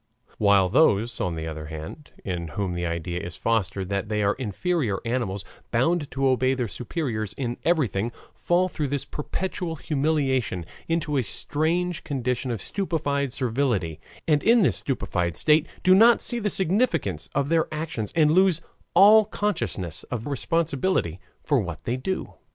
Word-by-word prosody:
While 100 -3 +5
those, 115 - +3
on 90 -2 -1
the 80 0 -4
other 80 -1 -6
hand, 80 - -8 0.2
in 90 -3 -3
whom 95 -3 -1
the 85 0 -2
idea 85 +1 -3
is 85 -1 -7
fostered 100 -4 -1
that 100 +1 -2
they 105 -1 0
are 100 +1 +3
inferior 130 - -1
animals, 115 -5 -2 0.2
bound 145 +5 +1
to 135 0 0
obey 130 0 +2
their 125 -2 -1
superiors 115 - -3
in 120 0 -3
everything, 120 - +1 0.2
fall, 180 +1 +1
through 155 -5 -3
this 140 0 -2
perpetual 175 +2 -4
humiliation, 135 - 0 0.2
into 165 -3 0
a - - +3
strange 160 - -1
condition 130 -3 -2
of 115 -5 -3
stupefied 145 -8 -1
servility, 120 - -1 0.3
and 150 -2 +3
in 230 -1 +5
this - - +2
stupefied 90 -10 -2
state 155 +1 +3 0.2
do 185 - +6
not 230 +5 +7
see 240 - 0
the 210 -2 0
significance 170 - 0
of 140 - +1
their 165 -1 +2
actions 155 -9 -3
and 155 -2 +4
lose 185 -1 +4 0.4
all 210 +4 +8
consciousness 105 - -2
of 120 -2 -5
responsibility 145 - 0 0.2
for 145 -3 +2
what 85 -7 -5
they 120 - -1
do. 185 +9 -3
130 Hz, 155 wpm, -25 LUFS, 100-165 Hz, 0.4 s, all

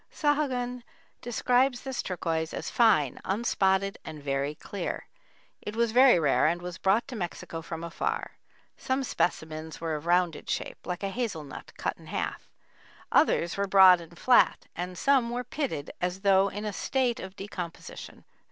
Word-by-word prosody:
Sahagun 260 -5 0 0.4
describes 245 +2 +1
this 265 -2 -3
turquoise 165 -3 -2
as - - -5
"fine, 195 - +3
unspotted 195 -2 +1
and 155 -1 -8
very 140 +1 -1
clear. 190 +3 -5 0.6
It 210 - -6
was 235 -1 +1
very 255 -2 +7
rare 150 -2 +3
and 170 +2 +1
was 175 -1 -7
brought 210 +6 +2
to 255 - -6
Mexico 175 -4 -5
from 165 0 -6
afar. 440 - -3 0.5
Some 265 0 -1
specimens 160 -8 -2
were 165 -1 -2
of 150 +2 -5
rounded 175 -2 +1
shape, - - -4
like 180 +2 -4
a 195 - 0
hazel 200 -8 -3
nut 140 - -10
cut - - -2
in - - -15
half; - - -4 0.6
others 170 +2 +3
were 200 0 0
broad 190 -2 +7
and 170 +1 -13
flat, 250 -1 +4
and 180 +1 -5
some 265 0 +3
were 245 +1 -2
pitted 245 - -3
as 180 +2 -2
though 195 -1 +4
in 205 +2 -6
a 210 - -3
state 255 0 0
of 190 0 -8
decomposition." 185 -4 -8
190 Hz, 160 wpm, -28 LUFS, 170-240 Hz, 0.6 s, very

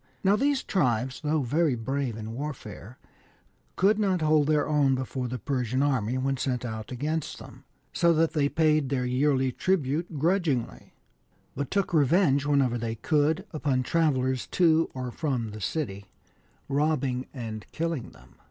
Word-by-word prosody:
Now 195 +1 +4
these 280 +3 +1
tribes, 125 - 0
though 150 -1 0
very 145 +2 +1
brave 130 0 -2
in 110 0 -6
warfare, 125 -4 -7 0.8
could 205 +3 +3
not 190 -4 +1
hold 155 -1 +3
their 150 -1 +2
own 145 -3 +3
before 130 0 -3
the 125 +1 -4
Persian 130 +2 -1
army 130 -4 0
when 135 +1 0
sent 125 -1 -2
out 110 -1 -6
against 150 +5 -3
them, - - -13 0.3
so 170 - +3
that 165 0 +2
they 145 -2 +2
paid 155 -3 +2
their 130 -2 0
yearly 130 +1 +1
tribute 160 0 -1
grudgingly, 160 -5 -1 0.6
but 140 0 -3
took 200 -2 -1
revenge, 145 -2 +3
whenever 135 -4 +2
they 115 0 -3
could, 150 +6 +1
upon 140 -4 0
travellers 130 -4 +1
to 165 -2 +3
or 130 -1 -4
from 125 -7 -2
the 105 0 -8
city, 100 -8 -3 0.6
robbing 140 -3 0
and 110 -5 -7
killing 165 -6 -3
them. - - -20
140 Hz, 150 wpm, -27 LUFS, 125-155 Hz, 0.8 s, Now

